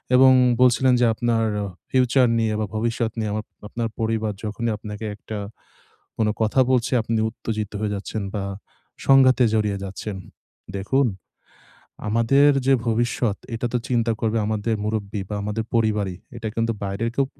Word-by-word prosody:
এবং 130 +1 +8 0.3
বলছিলেন 125 +1 +5
যে - - +5
আপনার 115 -1 +1 0.2
আ - - -2 0.2
ফিউচার 130 0 +3
নিয়ে 110 -1 +1
বা 110 - 0
ভবিষ্যৎ 115 +1 -1
নিয়ে 110 -1 -1
আমার 105 0 -3 0.2
আপনার 115 +1 -3
পরিবার 110 -1 0
যখনই 110 +2 -2
আপনাকে 105 0 -7
একটা 105 +1 -7 0.8
কোনো 110 -1 +2
কথা 110 +4 +2
বলছে 125 -1 +2
আপনি 115 0 -1
উত্তেজিত 110 -2 -4
হয়ে 105 -1 -1
যাচ্ছেন 100 +2 -4
বা 100 -2 -2 0.6
সংঘাতে 130 -2 +6
জড়িয়ে 105 -2 +1
যাচ্ছেন। 100 +1 -6 0.6
দেখুন, 130 +8 +1 1.0
আমাদের 115 +7 +4 0.2
যে 135 - +6
ভবিষ্যৎ 115 -1 0 0.2
এটা 120 +2 -2
তো - - +3
চিন্তা 120 -2 +2
করবে 115 0 +1
আমাদের 110 +1 0
মুরুব্বি 105 -1 -2
বা 105 - -3
আমাদের 105 +2 -2
পরিবারই। 105 -5 +1 0.2
এটা 115 -1 -4
কিন্তু 115 0 +1
বাইরের 100 +4 -2
কেউ 140 - +2
110 Hz, 150 wpm, -23 LUFS, 105-120 Hz, 1.0 s, এবং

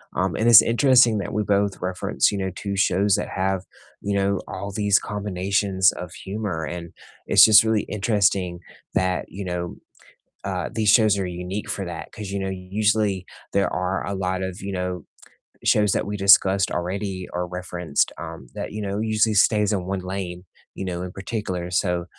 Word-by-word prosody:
Um, - - 0
and 110 - 0
it's 115 -2 +10
interesting 120 -2 +4
that 100 - -4
we 105 - 0
both 100 -1 0
reference, 90 +2 0
you 100 - -3
know, 95 -1 -2
2 100 -1 -4
shows 100 +1 +3
that 105 - -3
have, 95 -1 -1 0.4
you 100 0 -2
know, 100 0 +1
all 100 +2 -6
these 100 0 +2
combinations 100 -1 0
of 90 -2 -8
humor, 95 -5 -4
and 85 0 -7 0.3
it's - - +7
just 110 0 +8
really 110 -2 +1
interesting 100 -4 0 0.3
that, 90 -6 0
you 100 +3 -7
know, 90 -1 -4 0.7
uh, 95 -3 -3
these 110 -2 -1
shows 110 -2 +5
are 95 - -1
unique 90 +3 -5
for 100 - -3
that. 85 -2 -7
'Cause, 105 -2 -7
you 100 0 -3
know, 95 0 -2
usually 100 +1 0 0.3
there 100 - +1
are 90 +1 -2
a 100 - -3
lot 95 -1 -2
of, 95 +1 -5
you 100 - -5
know, 90 -2 -3 0.6
shows 105 -2 +3
that - - 0
we 105 - -3
discussed 95 -1 +5
already 95 +1 -3
or 90 0 -1
referenced, 90 -3 -2
um, 80 -4 -8
that, - - -5
you 105 - -5
know, 100 +1 -3
usually 110 0 +1
stays 105 +1 +3
in 95 -3 -1
one 95 0 -2
lane, 90 -1 -5 0.3
you 95 - -5
know, 90 -1 -3
in 90 - -5
particular, 95 -3 -4
so 90 -1 0
95 Hz, 185 wpm, -23 LUFS, 90-105 Hz, 0.7 s, it's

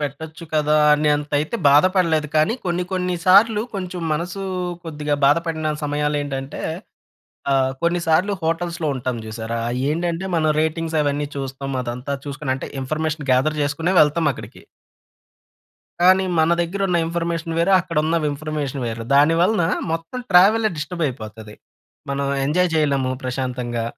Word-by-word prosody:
పెట్టొచ్చు 155 +3 -6
కదా! 150 0 +3 0.2
అనేంతయితే 150 +4 0
బాధపడలేదు 160 0 +3
కానీ, 155 +9 +3
కొన్ని 180 0 -1
కొన్ని 180 -1 -1
సార్లు, 210 +3 +6
కొంచెం 180 -2 -4
మనసూ 175 +5 -3 0.4
కొద్దిగా 150 -2 -2
బాధపడిన 155 +1 +1
సమయాలేంటంటే, 145 -2 -2 0.9
అహ్, 130 -1 +2
కొన్ని 175 +1 +1
సార్లు 185 +6 +3
హోటల్స్‌లో 165 0 -1
ఉంటాం 125 0 -3
జూసారా, 110 +1 -4
అయ్యేండంటే 165 +8 -1
మన 155 -1 +2
రేటింగ్స్ 160 0 -1
అవన్నీ 145 0 -1
చూస్తాం, 135 0 -5
అదంతా 125 +3 -4
చూసుకొని 140 -1 -2
అంటే, - - -7
ఇన్ఫర్మేషన్ 155 +1 -3
గ్యాద‌ర్ 150 +4 +2
చేసుకునే 160 +6 0
వెళ్తాం 150 +1 +2
అక్కడికి. - - -11 1.4
కానీ, 185 +1 +5
మన 160 +1 +3
దెగ్గరున్న 180 +1 0
ఇన్ఫర్మేషన్ 165 -1 -2
వేరు, 170 +4 +2
అక్కడున్న 165 -2 0
విమ్ఫర్మేషన్ 145 -2 -3
వేరు. 115 0 -4
దానివలన 165 +7 +4 0.3
మొత్తం 165 +10 -4
ట్రావెలే 210 +5 +5
డిస్టర్బయిపోతది. 120 -10 -5 0.6
మనం 140 0 -1 0.2
ఎంజాయ్ 175 +4 +2
చేయలేము 140 -4 +1
ప్రశాంతంగా. 125 -2 -3
155 Hz, 120 wpm, -21 LUFS, 140-170 Hz, 1.4 s, సార్లు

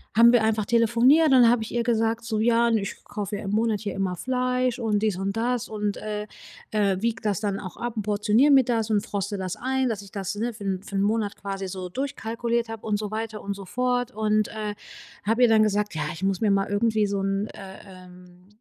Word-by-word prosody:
haben 235 +1 +7
wir 240 -2 +4
einfach 220 -1 +1
telefoniert 235 +8 +4
und 275 - +3
dann 245 -3 +7
hab 240 -1 +2
ich 220 - -6
ihr 240 0 0
gesagt, 230 0 0
so: 220 -2 -1
„Ja, 235 +1 +3
n 230 - +3
ich 195 - -6
kaufe 205 0 -4
ja 205 - -5
im 195 - -3
Monat 215 0 +1
hier 205 -3 -4
immer 190 -2 -2
Fleisch 250 +3 -1
und 215 -3 0
dies 215 -4 +1
und 195 +2 -2
das“ 240 +1 -1
und, 210 -1 -2
äh, 210 -1 -4 0.5
äh, 200 -3 +1
wiege 230 -1 -1
das 205 -3 0
dann 205 -2 -2
auch 185 -3 -8
ab 240 0 -4
und - - 0
portioniere 210 +6 +3
mir 270 -2 +7
das 230 -2 -1
und 210 -1 +1
froste 200 -2 -3
das 185 -1 -4
ein, 260 0 0
dass 215 -3 -3
ich 200 -1 -14
das, 195 -1 -4
ne, 230 +3 -2
für 210 -1 -10
'n 190 -2 -2
für 200 - -9
'n 195 - +2
Monat 210 -1 0
quasi 195 -1 -5
so 185 -1 -5
durchkalkuliert 235 0 -2
habe 225 -1 -8
und 210 -1 +1
so 210 0 -5
weiter 220 0 -4
und 200 - -3
so 195 -1 -9
fort. 250 +3 -1
Und, 215 -1 +1
äh, 215 -1 -4 0.5
habe 225 +4 +2
ihr 245 - +6
dann 220 -1 +5
gesagt: 210 -1 +1
„Ja, 155 - -3
ich 165 - -8
muss 195 -1 0
mir 215 - +3
mal 195 0 +2
irgendwie 215 +1 +1
so 200 0 -1
'n, 195 +1 0
äh, 195 -2 -10 0.2
ähm, 180 -1 -15
215 Hz, 245 wpm, -25 LUFS, 200-230 Hz, 0.5 s, haben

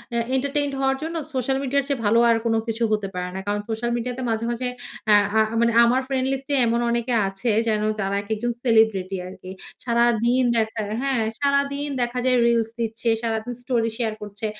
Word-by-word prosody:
আ - - +1 0.2
entertained 280 +1 -1
হওয়ার 270 0 +1
জন্য 330 +1 -4 0.2
social 265 +1 0
media 280 +1 +1
এর - - -11
চেয়ে 280 -4 -1
ভালো 230 +3 +4
আর 230 - +5
কোন 225 - +2
কিছু 225 +1 -2
হতে 210 -2 0
পারে 180 0 -3
না। - - -3
কারণ 205 0 0
সোশ্যাল 225 +2 -2
মিডিয়াতে 250 +2 -4
মাঝে, 225 +1 -1
মাঝে 250 +1 -2 0.5
আ - - +9 0.2
আ - - +6 0.2
মানে 235 0 +3
আমার 245 +2 +3
ফ্রেন্ড 265 -1 0
লিস্ট 270 +1 -3
এ - - +4
এমন 235 +1 +1
অনেকে 235 +1 0
আছে 195 +5 -1 0.2
যেন 215 -1 +1 0.2
তারা 195 0 -1
একেকজন 220 +3 -2
সেলিব্রিটি 220 -6 +2
আরকি। 185 0 -10 0.3
সারাদিন 235 +1 +2
দেখায় 220 -1 -1
হ্যাঁ, 270 -4 +1 0.2
সারাদিন 280 0 +1
দেখা 240 +1 -1
যায় 255 -1 +4
রিলস 230 -1 +2
দিচ্ছে, 230 +1 -1
সারাদিন 225 +1 -2
স্টোরি 235 -3 0
শেয়ার 225 -3 -1
করছে 205 +1 -6
235 Hz, 195 wpm, -23 LUFS, 220-260 Hz, 0.5 s, আ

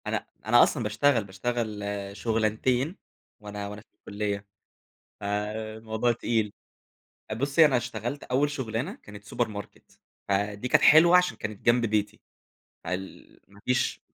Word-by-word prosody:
أنا - - -2 0.2
أنا - - +7
أصلًا - - 0
باشتغل، 115 +3 +2
باشتغل 105 +2 -3 0.3
شغلانتين 115 - 0 0.4
وأنا 105 -1 -6
وأنا 105 +1 -8
في - - -27
الكلية، 100 -1 -4 0.7
فالموضوع 110 +3 -2
تقيل، 110 -2 -1 0.8
بُصّي 140 +5 +4
أنا 135 -4 +3
اشتغلت 120 +3 -4
أوّل 135 +4 +1
شغلانة 130 - -3
كانت 105 0 -11
سوبر 115 +3 -1
ماركت، 105 -1 -10 0.3
فدي 100 +3 -1
كانت - - +4
حلوة 170 +3 +8
علشان 180 -11 +3
كانت 110 -2 -6
جنب 120 0 +4
بيتي، 105 -1 -1 0.6
فال 90 +2 -6
ما 100 +1 -18
فيش 125 0 +1
110 Hz, 125 wpm, -27 LUFS, 105-125 Hz, 0.8 s, حلوة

